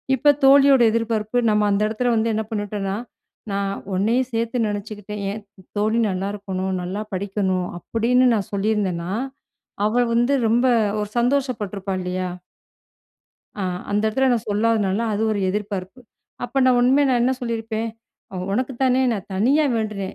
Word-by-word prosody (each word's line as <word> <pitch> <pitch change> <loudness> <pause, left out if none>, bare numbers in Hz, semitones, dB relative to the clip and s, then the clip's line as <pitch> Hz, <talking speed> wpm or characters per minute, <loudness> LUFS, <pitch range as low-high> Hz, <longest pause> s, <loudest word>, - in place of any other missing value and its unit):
இப்ப 290 +3 +4
தோழியோட 275 -1 +7
எதிர்பார்ப்பு 225 0 -1
நம்ம 210 0 +2
அந்த 200 +1 +1
இடத்தில 240 +3 0
வந்து 225 +1 +1
என்ன 220 +1 -1
பண்ணிட்டோன்னா, 205 -2 -3 0.6
நான் 195 0 -1 0.2
உன்னையும் 235 +7 +1
சேர்த்து 230 +2 -1
நினச்சுக்கிட்டேன் 210 0 -5
"ஏன் 215 - -6 0.4
தோழி 220 +3 +1
நல்லாருக்கணும், 190 0 -3
நல்லா 185 +4 -4
படிக்கணும்", 190 -1 -1
அப்பிடின்னு 240 +6 +2
நான் 205 -3 -3
சொல்லியிருந்தன்னா, 195 -4 -1 0.7
அவ 240 +3 +2
வந்து 240 +4 +2 0.2
ரொம்ப 240 +3 +3 0.4
ஒரு 210 - -4
சந்தோஷப்பட்டுருப்பா, 225 -7 -1
இல்லயா! 180 0 -2 1.3
அ - - -1 0.3
அந்த 205 - +1
இடத்துல 265 +5 +2
நான் 230 -2 -2
சொல்லாததுனால 210 -1 +1
அது 210 - -1
ஒரு 205 - -1
எதிர்பார்ப்பு. 200 +2 -4 0.4
அப்போ 245 +3 -2
நான் 255 -1 +4
உண்மைய 265 +4 +4
நான் 245 -2 +2
என்ன 255 +2 +3
சொல்லியிருப்பேன், 225 -1 -3 0.5
"ஒ 190 - -5 0.2
உனக்கு 255 +4 -1
தானே 260 0 +3
நான் 200 -5 -5
தனியா 270 +10 +3
வேண்டுனேன். 210 -3 -3
215 Hz, 140 wpm, -22 LUFS, 200-240 Hz, 1.3 s, தோழியோட